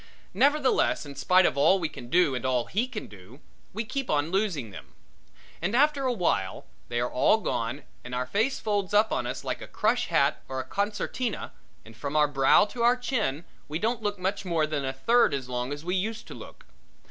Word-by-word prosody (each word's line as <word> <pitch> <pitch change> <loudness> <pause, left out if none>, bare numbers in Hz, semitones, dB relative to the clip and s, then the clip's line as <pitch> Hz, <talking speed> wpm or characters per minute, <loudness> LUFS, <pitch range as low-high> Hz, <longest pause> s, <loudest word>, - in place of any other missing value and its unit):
Nevertheless, 280 - +2
in 140 - -8
spite 185 +6 +4
of - - +2
all 190 +7 +5
we 170 -4 -1
can 125 -5 -10
do 175 -2 +3
and 125 - -3
all 125 -2 +1
he 225 +6 -1
can 235 -4 -6
do, 105 +6 -14 0.3
we 220 +4 -3
keep 270 +3 -4
on 150 +2 +1
losing 185 - -1
them. 95 - -12 0.7
And 190 +7 -1
after 280 0 +3
awhile, 175 - -1 0.2
they 120 0 -2
are 120 +1 -1
all 135 +12 +4
gone 120 - -3 0.2
and 125 0 -6
our 125 0 -1
face 220 - 0
folds 205 -2 -1
up 215 +1 +4
on 120 - -1
us 130 +2 -5
like - - -3
a - - -8
crush - - 0
hat - - +2
or 130 0 -4
a - - -2
concertina 210 - -3 0.3
and 115 0 -14
from 140 +5 -5
our 150 -1 +5
brow 135 +5 +4
to 235 +3 -7
our 240 +2 +4
chin 220 - -2 0.2
we 150 - -3
don't 225 +5 -1
look 205 -1 -2
much 190 +3 -2
more 170 -4 +1
than 150 -2 -2
a 135 - -1
third 230 - +3
as 130 -2 -5
long 125 +1 -3
as 145 +2 -6
we 180 - -1
used 215 +4 -2
to - - -7
look. - - -12
175 Hz, 215 wpm, -27 LUFS, 130-220 Hz, 0.7 s, all